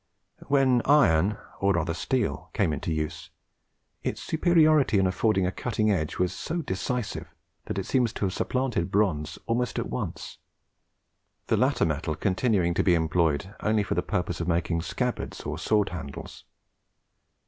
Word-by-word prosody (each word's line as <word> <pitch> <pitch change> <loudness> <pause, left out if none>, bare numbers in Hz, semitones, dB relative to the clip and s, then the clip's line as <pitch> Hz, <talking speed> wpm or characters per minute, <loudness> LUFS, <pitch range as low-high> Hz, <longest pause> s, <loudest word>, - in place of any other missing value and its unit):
When 135 -3 +4
iron, 105 - +4 0.2
or 100 0 +3
rather 85 -1 0
steel, 125 +6 -2
came 80 - +1
into 75 - -3
use, 75 -1 -3 0.7
its - - -3
superiority 155 - +3
in 95 - +3
affording 95 +1 +2
a 90 - 0
cutting 110 +1 0
edge 80 -6 -1
was 90 0 0
so 165 - -3
decisive 100 - -3 0.4
that - - -4
it 95 - -2
seems 125 -4 +1
to - - -2
have 95 - -1
supplanted 125 -9 -1
bronze 95 -7 0
almost 120 +1 -1
at - - -2
once; 65 - -5 1.1
the - - +1
latter - - +2
metal 75 0 -1
continuing 95 - +1
to - - +1
be 90 - +4
employed 80 +1 +1
only 110 -1 +1
for - - -2
the 90 - +1
purpose 90 -2 -2
of 85 - -3
making 85 -1 0
scabbards - - -3
or - - -5
sword 105 -2 +2
handles. 80 -6 -8
95 Hz, 155 wpm, -27 LUFS, 85-120 Hz, 1.1 s, When